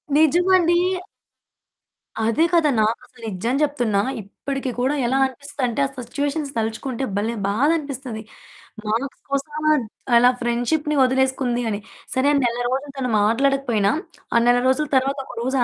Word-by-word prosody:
నిజమండి. 345 +3 +4 1.5
అదే 230 +8 +2
కదా! 330 -3 +4
నాకసలు 225 +2 -2
నిజం 220 +5 -2
చెప్తున్నా 245 -9 +1 0.2
ఇప్పటికి 265 +6 -5
కూడా 260 +3 +1
ఎలా 260 +3 +1
అనిపిస్తుందంటే, 265 -2 -3
ఆ - - -3 0.2
సిట్యుయేషన్స్ 285 +3 -2
తలుచుకుంటే 225 +4 -2
భలే 220 +3 -1
బాధనిపిస్తది. 270 -1 -1 0.7
మార్క్స్ 235 +6 -2
కోసం 275 +2 -2 0.3
ద్ - - -6 0.3
అలా 245 +1 +7
ఫ్రెండ్‌షిప్‌ని 245 +6 0
వదిలేసుకుంది 260 -1 +1
అని. 205 - -2 0.4
సరే, 260 +2 +3
నెల 240 -1 0
రోజులు 275 +2 -2
తను 255 -2 -1
మాట్లాడకపోయినా, 230 -2 +2 0.4
ఆ - - +7
నెల 245 0 +5
రోజుల 265 +4 +2
తరువాత 270 +2 +2
ఒకరోజు 260 +3 -3
260 Hz, 125 wpm, -22 LUFS, 235-285 Hz, 1.5 s, అలా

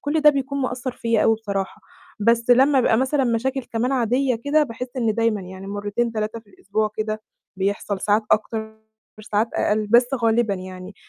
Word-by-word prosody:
كُلّ 305 +2 0
ده 300 0 +7
بيكون 280 0 -2
مأثر 255 0 -3
فيّا 230 -3 0
أوي 225 - +4
بصراحة، 200 -3 -4 0.4
بس 230 +2 +2
لمّا 265 +2 +5
بيبقى 225 - +3
مثلًا 265 +1 +1
مشاكل 255 +3 0
كمان 240 +4 -1
عادية 250 +1 +1
كده، 300 +2 +3
باحِسّ 250 -2 -4
إن 225 -4 +1
دايمًا 230 -3 +1
يعني 190 +1 -9
مرتين، 205 +3 -2
3، 215 +1 -3
في 220 - -32
الأسبوع 210 +2 -2
كده 215 0 -3 0.3
بيحصل، 200 0 -2
ساعات 210 +2 +2
أكتر، 220 0 0 0.5
ساعات 215 +2 0
أقل، 215 0 +1
بس 240 +3 +5
غالبًا 230 -3 +2
يعني 185 +1 -9
225 Hz, 175 wpm, -22 LUFS, 210-250 Hz, 0.5 s, ده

